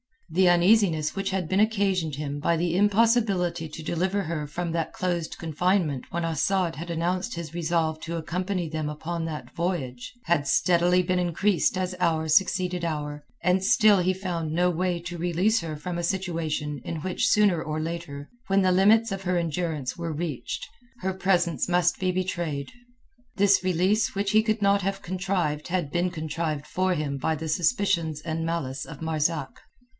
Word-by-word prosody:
The 185 +3 +4
uneasiness 175 -3 +3
which 195 0 -1
had 190 -3 -2
been 190 +4 +1
occasioned 195 -8 +1
him 145 0 -4
by 170 +3 +2
the 170 +1 0
impossibility 200 -5 +2
to 155 +1 -9
deliver 185 +5 0
her 155 -3 -3
from 170 +3 -3
that 165 -1 -2
close 175 -3 -1
confinement 165 -3 -1
when 170 0 -2
Asad 165 +2 0
had 170 +2 -6
announced 180 +6 -1
his 165 -2 -6
resolve 165 -2 0
to 170 +1 -5
accompany 180 +2 -2
them 155 -1 -3
upon 165 +2 -4
that 155 -2 -6
voyage, 150 -9 -3
had 160 -5 +1
steadily 180 +4 +3
been 180 +1 0
increasing 180 +1 +1
as 185 0 -2
hour 160 -3 +1
succeeded 180 +1 +2
hour, 150 -2 -4 0.2
and 185 +1 +2
still 215 -2 +5
he 185 +1 +2
found 175 -4 -3
no 180 +2 +3
way 180 +1 -1
to 175 0 -6
release 180 +6 +2
her 160 -2 -5
from 170 +4 -5
a - - -3
situation 165 -5 -2
in 160 +1 -4
which 185 +2 0
sooner 205 -6 +4
or 155 -1 -3
later, 155 -3 -5 0.2
when 195 0 +3
the 185 -1 +3
limits 215 +4 +4
of 195 0 -4
her 180 -1 0
endurance 165 -4 -2
were 170 -2 -3
reached, 150 -6 -4 0.3
her 190 0 -1
presence 180 -3 +1
must 175 0 +2
be 185 -1 +1
betrayed. 175 -6 -3 0.6
This 200 -1 +4
release 185 +5 +1
which 200 0 0
he 215 - +5
could 220 -1 -1
not 200 0 +3
have 195 +1 -3
contrived 180 -5 -1
had 175 -5 -1
been 175 +2 +1
contrived 155 -2 -3
for 185 +2 0
him 145 -3 -2
by 160 +4 0
the 160 +1 -5
suspicions 165 -3 +1
and 165 0 -3
malice 140 -6 -3
of - - -10
Marzak. 155 -3 -1
175 Hz, 175 wpm, -26 LUFS, 160-185 Hz, 0.6 s, still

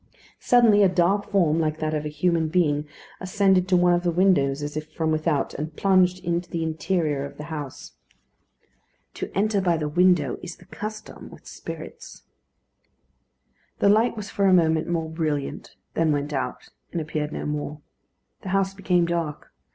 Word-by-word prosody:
Suddenly 230 -4 +5
a 195 - +6
dark 190 +3 +1
form, 170 -6 +2
like 155 -1 0
that 155 0 -2
of 150 -1 -2
a - - -2
human 160 +2 +1
being, 155 -3 +1 0.3
ascended 185 -1 +2
to 185 -1 +3
one 175 0 +4
of 175 - +2
the 175 - 0
windows, 160 -6 +2
as 145 0 -5
if 155 0 -5
from 160 0 -1
without, 155 -2 0
and 155 +2 -5
plunged 185 -1 +2
into 170 0 -1
the 165 -1 -2
interior 160 -2 -1
of 140 0 -8
the 150 - -7
house. 145 -4 -7 1.2
To - - -5
enter 205 0 +2
by 175 -3 +2
the 155 -1 -2
window 175 0 +2
is 180 -1 -7
the 180 - -19
custom 215 +3 -8
with - - -15
spirits. - - -9 1.5
The 200 - +3
light 225 +3 +3
was 210 -1 -6
for 200 - 0
a 190 - +5
moment 160 -3 +3
more 165 -2 -1
brilliant, 155 -3 -3 0.2
then 165 -1 +2
went 145 0 -2
out, 130 -2 -4 0.2
and 170 - -2
appeared 155 -1 -3
no - - -5
more. 150 0 -4 0.6
The 190 - -7
house 195 0 +1
became 180 -2 +1
dark. 170 -3 -3
170 Hz, 175 wpm, -24 LUFS, 150-185 Hz, 1.5 s, a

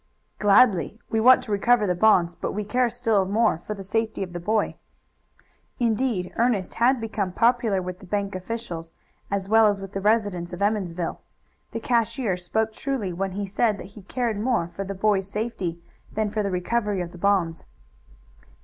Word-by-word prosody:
"Gladly. 210 0 +4
We 225 - +2
want 255 +3 +6
to 215 - -7
recover 215 +2 +3
the 180 - +1
bonds, 180 -3 +4
but - - -4
we 210 - -2
care 245 +4 +1
still 225 -4 +1
more 210 -2 +2
for 210 +5 -6
the 195 - -8
safety 220 +1 -1
of 180 -2 -8
the 175 - -4
boy." 215 +5 0 1.0
Indeed 230 -5 0
Ernest 230 -6 +1
had 250 +2 +3
become 215 -4 -2
popular 230 -3 +2
with 180 0 -6
the 190 - -13
bank 200 +1 -2
officials 185 -4 -5 0.4
as 200 -1 -2
well 220 +1 +6
as 205 -1 +1
with 195 -1 -8
the 195 - -3
residents 205 -5 +1
of 175 - -6
Emmonsville. 185 -5 -1 0.5
The 230 - -3
cashier 230 -3 +1
spoke 220 +5 -1
truly 235 -8 -3
when 190 +2 -3
he 200 +1 -3
said 205 +2 +1
that - - -8
he 215 - -11
cared 230 +1 -2
more 225 -7 0
for 195 - -5
the 195 0 -5
boy's 195 -1 +1
safety 200 -6 -3 0.3
than 215 -1 -1
for 215 0 -1
the 200 - -1
recovery 200 +2 -1
of 170 -1 -5
the 175 - -12
bonds. 180 -4 +1
205 Hz, 185 wpm, -25 LUFS, 185-225 Hz, 1.0 s, want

